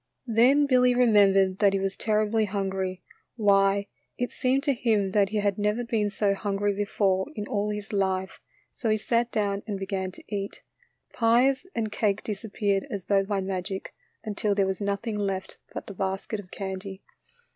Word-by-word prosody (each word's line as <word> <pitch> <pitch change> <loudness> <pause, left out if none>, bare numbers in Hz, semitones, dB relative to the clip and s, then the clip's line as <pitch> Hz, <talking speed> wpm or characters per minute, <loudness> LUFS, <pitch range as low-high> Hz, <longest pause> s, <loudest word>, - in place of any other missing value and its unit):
Then 255 +5 +4
Billy 250 -2 +4
remembered 195 -5 +4
that 200 -2 +4
he 195 - +1
was 195 0 -2
terribly 215 0 +1
hungry. 190 -2 -3 0.3
Why, 200 -2 +3 0.3
it 245 - -2
seemed 265 +1 +1
to 285 -1 +2
him 220 -6 +1
that 200 -1 +3
he 215 - -2
had 205 -1 0
never 210 +3 +1
been 220 -3 0
so 205 -1 +1
hungry 200 0 -1
before 195 -2 0
in 210 -2 -4
all 210 -2 -1
his 210 0 -5
life, 190 -1 -1 0.3
so 230 - -2
he 215 - +3
sat 235 +2 0
down 200 -2 0
and 205 -2 -2
began 190 -1 -3
to - - -13
eat. 200 -1 -5 0.5
Pies 250 +7 +3
and 220 -2 -1
cake 210 -2 0
disappeared 205 -2 -1
as 200 -3 -5
though 195 -1 +3
by 200 0 -1
magic, 190 0 -4 0.3
until 210 -1 -1
there 195 -1 +3
was 190 +1 -2
nothing 200 +2 -2
left 195 -2 -3
but - - -6
the 200 - -8
basket 195 +3 -3
of 190 -3 -11
candy. 190 0 -6
205 Hz, 175 wpm, -27 LUFS, 195-220 Hz, 0.5 s, Then